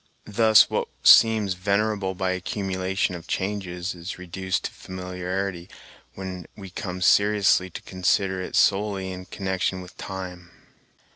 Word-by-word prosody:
Thus, 110 0 +5
what - - -1 0.2
seems 110 -4 +6
venerable 100 +1 0
by 95 0 -1
an 95 - -1
accumulation 95 0 -2
of 85 -2 -8
changes 95 -2 -3
is 85 +1 -7
reduced 90 +1 -3
to - - -3
familiarity 90 0 -5 0.5
when 95 -2 -7
we 95 -3 -10
come 90 0 -5
seriously 100 -2 +4
to - - -9
consider 95 0 0
it 90 - -5
solely 95 -2 +2
in 90 0 -7
connection 95 -1 -2
with 90 0 -11
time. 90 -2 -7
95 Hz, 135 wpm, -25 LUFS, 90-100 Hz, 0.5 s, seems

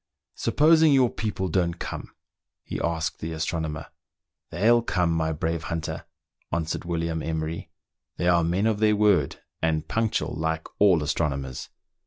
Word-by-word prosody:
"Supposing 160 0 +4
your 130 -3 +4
people 105 -4 -2
don't 85 0 0
come?" - - -6 0.5
he - - -5
asked 85 -1 -1
the 80 +1 -4
astronomer. 80 0 -3 0.6
"They'll 115 +7 +4
come, 90 -7 +1
my 80 -1 0
brave 80 +1 -2
hunter," 85 -1 -4 0.5
answered 80 0 -2
William 85 -1 -2
Emery: 80 +1 -3 0.2
" - - -58
they 90 - 0
are 85 -1 +4
men 90 +5 +1
of 110 -2 +1
their 105 -1 +4
word, 100 -9 +2 0.2
and 80 -1 0
punctual, 110 -1 0
like 80 0 -2
all 95 -6 +5
astronomers. 70 -4 -2
85 Hz, 145 wpm, -26 LUFS, 80-105 Hz, 0.6 s, all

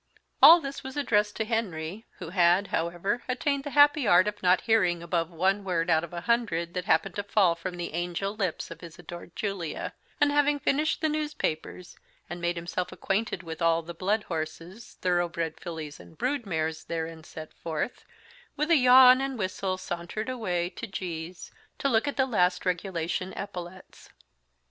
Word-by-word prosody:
All 320 +6 +11
this 275 -3 -6
was 265 +1 -7
addressed 210 -7 +1
to 220 - -1
Henry, 210 -3 -3
who - - -7
had, 180 +1 +4
however, 175 +8 -1
attained 275 +2 0
the 290 - -4
happy 290 -2 +5
art 185 +1 +6
of 210 0 -4
not 180 0 +4
hearing 180 -7 +2
above 170 -1 -1
one 190 +4 +1
word 175 -2 0
out 160 0 +3
of 170 - -7
a 170 -1 -5
hundred 175 -7 0
that 180 -1 -3
happened 165 +4 +2
to 205 - -1
fall 200 -4 +3
from 175 +2 -6
the 175 -2 -5
angel 175 +4 -2
lips 185 -6 -3
of 165 - -9
his 170 -2 -11
adored 175 0 -10
Julia; 195 -6 -3 0.3
and, 290 -1 +4
having 290 0 +3
finished 300 +3 0
the 315 - +2
newspapers, 300 - -3 0.4
and 175 0 -5
made 175 0 0
himself 175 +1 -3
acquainted 195 -2 -2
with 160 0 -7
all 165 0 +3
the 170 +1 -8
blood 200 +6 0
horses, 165 +6 -6
thoroughbred 175 -2 0
fillies, 160 -4 -7
and 160 - -15
brood 255 -2 -1
mares 160 -2 -2
therein 165 -1 -4
set 155 0 -10
forth, 165 +9 -4 0.5
with 300 +3 -1
a 330 - +7
yawn 255 0 +8
and 270 -1 -3
whistle 185 -1 -2
sauntered 175 +6 -5
away 180 -8 -2
to 230 - -7
G 170 -5 -5
's, 185 - -12 0.3
to - - 0
look 235 0 +2
at 285 - -3
the 265 - +4
last 180 -8 +1
regulation 180 0 -2
epaulettes. 185 -2 -8
185 Hz, 180 wpm, -28 LUFS, 170-230 Hz, 0.5 s, All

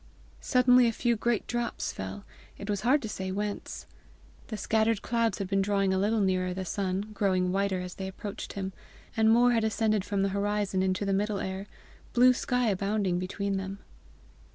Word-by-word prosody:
Suddenly 250 -1 +5
a - - +2
few 235 +1 +1
great 230 0 0
drops 240 -1 -2
fell 205 - -6 0.3
it 200 +1 -4
was 200 -1 -1
hard 260 +5 +3
to - - -3
say 190 -2 -4
whence. 205 +1 -4 0.6
The 215 - -5
scattered 220 +1 +1
clouds 230 -3 +1
had 195 - -3
been 195 +1 +1
drawing 195 -1 +1
a 190 - +1
little 210 +2 +2
nearer 185 -2 +1
the 190 0 -4
sun, 195 +2 -2
growing 185 -3 +1
whiter 195 -1 0
as 180 0 -6
they 190 - -5
approached 195 +1 -6
him, 190 -1 -4 0.4
and 220 -1 +4
more 240 +2 +5
had 230 -2 +2
ascended 220 -2 +1
from 200 -1 -1
the 195 - +1
horizon 200 -1 0
into 190 +1 0
the 195 - +1
middle 205 +1 0
air, 190 +1 -4 0.5
blue 250 +1 +6
sky 250 -1 0
abounding 195 -2 0
between 195 +2 -2
them. 190 +1 -5
200 Hz, 185 wpm, -29 LUFS, 190-220 Hz, 0.6 s, blue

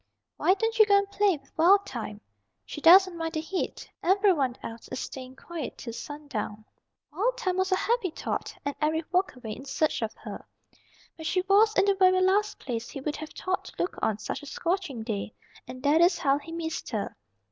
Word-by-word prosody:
"Why 375 - +4
don't 450 +3 -1
you 435 - +8
go 400 -1 +6
and 400 0 +1
play 400 -4 +3
with 275 -1 -26
Wild 390 +5 +5
Thyme? 215 -3 -6 0.4
She 300 - -7
doesn't 370 +2 +7
mind 325 -1 -3
the 315 - -1
heat. 350 +4 -4
Every 390 +2 +4
one 265 -6 0
else 230 0 -8
is 255 - -5
staying 260 -1 -7
quiet 325 0 -6
till 230 - -7
sundown." 235 -5 -6 0.5
Wild 475 +10 0
Thyme 370 -6 -1
was 375 +1 +1
a - - +5
happy 455 -1 0
thought, 315 - -4
and 285 - -1
Eric 310 +1 +1
walked 365 -3 +1
away 240 -4 -7
in 250 - -7
search 280 +1 0
of 220 -1 -1
her. - - -8 0.7
But 320 -1 -5
she 365 - +2
was 410 +3 +4
in - - +5
the 400 - +4
very 370 -1 +4
last 405 +3 +2
place 235 -3 -4
he - - -6
would 295 +3 -3
have 310 - -7
thought 370 0 -3
to - - -11
look 355 - -1
on 215 -2 +1
such 215 - -5
a 290 - -10
scorching 335 - -2
day, 215 -2 -4 0.3
and 255 0 -9
that 295 +3 +4
is 345 +1 +5
how 275 0 +2
he 315 +3 -11
missed 330 -1 -4
her. 215 -4 -3
325 Hz, 210 wpm, -28 LUFS, 265-380 Hz, 0.7 s, you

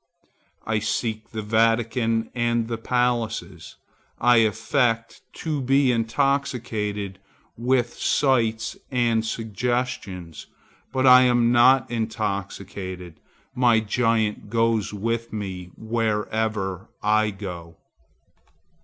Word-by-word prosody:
I 110 -1 0
seek 110 0 -2
the 110 -1 -5
Vatican 115 +1 +1
and 120 -1 0
the 115 -1 -4
palaces. 120 -1 -2 0.4
I 120 -1 +4
affect 115 +1 +1
to 155 -3 -3
be 135 0 +3
intoxicated 115 -5 -1 0.4
with 120 0 +1
sights 115 -5 +1
and 120 -3 +1
suggestions, 110 -6 -3 0.4
but 130 0 0
I 125 0 +9
am 120 -1 +3
not 120 0 +5
intoxicated. 100 -5 -4 0.3
My 120 -3 +4
giant 110 -1 0
goes 115 -1 +1
with 115 +3 -3
me 95 -4 -5
wherever 110 -3 -2
I 105 +1 +3
go. 90 -5 -8
115 Hz, 90 wpm, -24 LUFS, 105-120 Hz, 0.4 s, I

